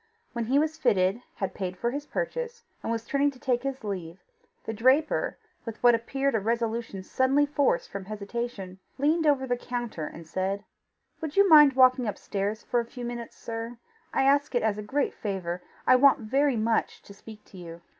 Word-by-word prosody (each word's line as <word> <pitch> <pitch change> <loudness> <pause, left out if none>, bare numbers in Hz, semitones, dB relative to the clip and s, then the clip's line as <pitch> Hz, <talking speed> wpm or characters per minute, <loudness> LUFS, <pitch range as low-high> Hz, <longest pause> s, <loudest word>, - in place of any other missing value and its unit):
When 235 -1 -2
he 260 +5 +2
was 315 +2 0
fitted, 200 -3 +2
had 195 - -3
paid 185 -2 -4
for 235 +5 -1
his 290 +2 -5
purchase, 475 -1 -4 0.2
and - - -3
was 230 0 -2
turning 280 +3 +2
to 265 -3 -12
take 250 -2 0
his 270 -1 -4
leave, 185 -5 -5 0.5
the 225 - -3
draper, 260 +8 +2 0.3
with 230 -2 -6
what 240 -1 +7
appeared 270 +4 0
a 225 - +2
resolution 225 -2 -2
suddenly 265 +7 +2
forced 285 -9 +1
from 195 -1 -6
hesitation, 205 -2 -5 0.2
leaned 310 +3 +2
over 275 -3 +3
the 245 -1 0
counter 240 -11 -4
and 165 - -10
said: 190 +4 -2 0.6
"Would 315 +2 -5
you 400 0 +6
mind 300 -5 +8
walking 255 -2 +5
up 210 - -3
stairs 205 +3 -3
for 245 - 0
a 235 - -2
few 245 +1 -8
minutes, 240 -1 -6
sir? 230 +1 -6 0.3
I 270 - +1
ask 285 0 +2
it 240 - +2
as 215 -1 0
a - - -3
great 270 +7 -1
favour. 180 -4 -4 0.2
I 255 - +6
want 275 0 +5
very 270 +3 +1
much 225 +1 0
to 200 - -13
speak 215 +1 -13
to 190 - -15
you." 170 -1 -9
235 Hz, 195 wpm, -27 LUFS, 205-275 Hz, 0.6 s, mind